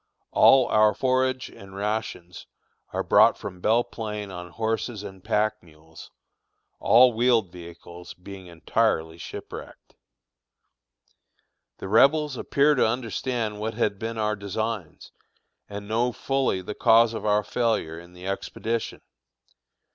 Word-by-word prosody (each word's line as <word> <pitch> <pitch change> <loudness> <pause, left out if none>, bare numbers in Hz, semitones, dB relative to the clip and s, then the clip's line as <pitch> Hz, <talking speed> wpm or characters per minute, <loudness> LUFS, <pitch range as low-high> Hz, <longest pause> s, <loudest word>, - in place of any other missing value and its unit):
All 135 -2 +6
our 110 -2 +3
forage 130 0 0
and 95 -1 -13
rations 100 -4 -4 0.4
are - - -2
brought - - +5
from 90 -1 -8
Belle 115 +4 +3
Plain 105 -4 -6
on 90 -1 -8
horses 110 +2 -3
and 95 -2 -10
pack 110 0 0
mules, 80 -1 -15 0.7
all 125 +1 +6
wheeled 115 -5 +2
vehicles 85 0 -11
being 95 0 -11
entirely 85 -1 -1
shipwrecked. - - -10 1.8
The - - -7
Rebels 140 +7 +4
appear 140 +4 +2
to 145 - +3
understand 115 -1 -3
what 110 +1 -3
had 100 -2 -1
been 115 0 -4
our 105 -1 0
designs, 100 -2 -5 0.6
and 100 0 -7
know 115 +3 0
fully 135 -7 -1
the 105 - -5
cause 115 +2 +4
of 110 - -5
our 105 0 +2
failure 105 -7 -1
in 85 +1 -15
the 90 +1 -12
expedition. 110 +4 -4
105 Hz, 125 wpm, -25 LUFS, 95-115 Hz, 1.8 s, All